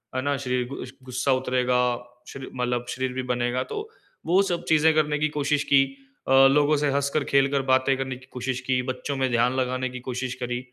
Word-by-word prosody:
है 130 Hz, -, 0 dB
ना? 145 Hz, +1 st, 0 dB
शरीर 125 Hz, -2 st, -1 dB
गूस 130 Hz, -1 st, -7 dB
गुस्सा 130 Hz, +1 st, -1 dB
उतरेगा, 125 Hz, -1 st, 0 dB, 0.5 s
शरी 135 Hz, -1 st, -8 dB
मतलब 125 Hz, -1 st, -1 dB
शरीर 130 Hz, 0 st, -2 dB
भी 130 Hz, 0 st, -3 dB
बनेगा। 120 Hz, +1 st, 0 dB
तो, 425 Hz, +1 st, -4 dB, 0.4 s
वो 180 Hz, +4 st, +4 dB
सब 175 Hz, -3 st, -2 dB
चीज़ें 160 Hz, 0 st, +5 dB
करने 150 Hz, -1 st, +1 dB
की 155 Hz, +1 st, +1 dB
कोशिश 145 Hz, 0 st, +1 dB
की। 135 Hz, 0 st, +7 dB, 0.4 s
अ, -, -, -1 dB, 0.2 s
लोगों 150 Hz, +1 st, +3 dB
से 145 Hz, 0 st, +1 dB
हँसकर, 140 Hz, +1 st, 0 dB
खेल 140 Hz, 0 st, +3 dB
कर 140 Hz, -1 st, +1 dB
बातें 130 Hz, +1 st, +3 dB
करने 130 Hz, -1 st, -3 dB
की 130 Hz, +1 st, -15 dB
कोशिश 125 Hz, 0 st, -3 dB
की, 130 Hz, -1 st, +2 dB
बच्चों 130 Hz, +2 st, -3 dB
में 130 Hz, -1 st, +1 dB
ध्यान 120 Hz, +1 st, +2 dB
लगाने 130 Hz, 0 st, -1 dB
की 125 Hz, 0 st, -7 dB
कोशिश 125 Hz, 0 st, -3 dB
करी। 125 Hz, 0 st, -2 dB
130 Hz, 205 wpm, -25 LUFS, 125-140 Hz, 0.5 s, की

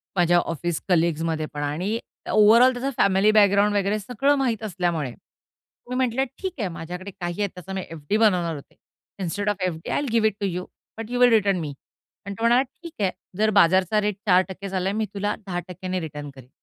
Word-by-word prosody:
माझ्या 175 Hz, -1 st, +4 dB
ऑफिस 170 Hz, 0 st, -2 dB
कलीग्समध्ये 165 Hz, -2 st, +1 dB
पण 145 Hz, 0 st, -3 dB
आणि 180 Hz, +10 st, -2 dB, 0.3 s
ओव्हरऑल 225 Hz, +4 st, +6 dB
त्याचा 255 Hz, +2 st, -2 dB
फॅमिली 195 Hz, +2 st, +4 dB
बॅकग्राउंड 205 Hz, -1 st, +4 dB
वगैरे 205 Hz, +1 st, +1 dB
सगळं 250 Hz, +7 st, +1 dB
माहित 240 Hz, -5 st, -1 dB
असल्यामुळे 175 Hz, -, -2 dB, 0.8 s
मी 250 Hz, -, -3 dB
म्हटलं, 255 Hz, 0 st, +1 dB, 0.2 s
"ठीक 380 Hz, -2 st, -3 dB
आहे, 210 Hz, -, 0 dB
माझ्याकडे 180 Hz, +3 st, -7 dB
काही 175 Hz, 0 st, -5 dB
आहेत. 200 Hz, -, +1 dB
त्याचा 180 Hz, +1 st, -8 dB
मी 190 Hz, -, -2 dB
एफडी 165 Hz, +5 st, -2 dB
बनवणार 180 Hz, -7 st, +2 dB
होते. 140 Hz, -, -12 dB, 0.4 s
Instead 200 Hz, +3 st, -2 dB
of 205 Hz, -2 st, -2 dB
FD 165 Hz, -2 st, -6 dB
I -, -, +1 dB
will 285 Hz, -, -3 dB
give 225 Hz, -1 st, +3 dB
it 215 Hz, -, -1 dB
to -, -, +1 dB
you, 180 Hz, 0 st, -4 dB, 0.3 s
but 225 Hz, +1 st, -7 dB
you 245 Hz, -, -1 dB
will 250 Hz, 0 st, +7 dB
return 200 Hz, -4 st, +3 dB
मी." 150 Hz, -3 st, -4 dB, 0.5 s
आणि 200 Hz, 0 st, -5 dB
तो -, -, -4 dB
म्हणाला, 240 Hz, +2 st, +5 dB
"ठीक 325 Hz, +5 st, -13 dB
आहे. 190 Hz, -2 st, +2 dB, 0.3 s
जर 215 Hz, +1 st, +3 dB
बाजारचा 190 Hz, +4 st, +4 dB
रेट 210 Hz, -1 st, -1 dB
4% 190 Hz, +1 st, +2 dB
चालला 190 Hz, 0 st, -1 dB
आहे, 200 Hz, -, -2 dB
मी 220 Hz, -, 0 dB
तुला 205 Hz, +1 st, -1 dB
10% 185 Hz, +1 st, -4 dB
रिटर्न 150 Hz, -3 st, -6 dB
करीन." 130 Hz, -2 st, -14 dB
195 Hz, 200 wpm, -24 LUFS, 175-215 Hz, 0.8 s, will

